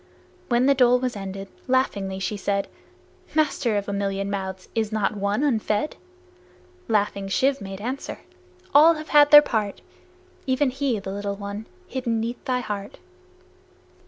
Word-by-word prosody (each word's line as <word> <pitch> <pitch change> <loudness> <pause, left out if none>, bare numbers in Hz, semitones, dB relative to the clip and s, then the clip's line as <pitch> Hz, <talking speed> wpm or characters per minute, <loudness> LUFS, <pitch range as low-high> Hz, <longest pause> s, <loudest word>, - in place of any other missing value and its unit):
When 240 +1 +3
the 280 - +5
dole 250 -2 +5
was 250 -1 -2
ended, 195 0 -6 0.2
laughingly 200 -7 0
she 190 +2 -2
said, 200 0 -1 0.7
"Master, 280 -8 +1
of 200 - -3
a 200 - -2
million 200 0 -2
mouths, 190 -1 -4
is 220 -1 -1
not 215 -1 0
one 205 +5 0
unfed?" 220 -1 0 0.9
Laughing, 205 -2 0
Shiv 265 +8 +1
made 195 -1 -7
answer, 250 +6 -5 0.5
"All 315 +4 +7
have 310 0 -8
had 290 -1 +6
their 295 0 +10
part, 215 -7 -2 0.7
Even 260 +1 +2
he, 265 -3 -1
the 195 -1 -6
little 200 0 -3
one, 200 +2 -6 0.2
hidden 240 -4 -2
'neath 230 +2 -4
thy 250 -1 0
heart." 205 -3 -5
215 Hz, 150 wpm, -24 LUFS, 200-260 Hz, 0.9 s, their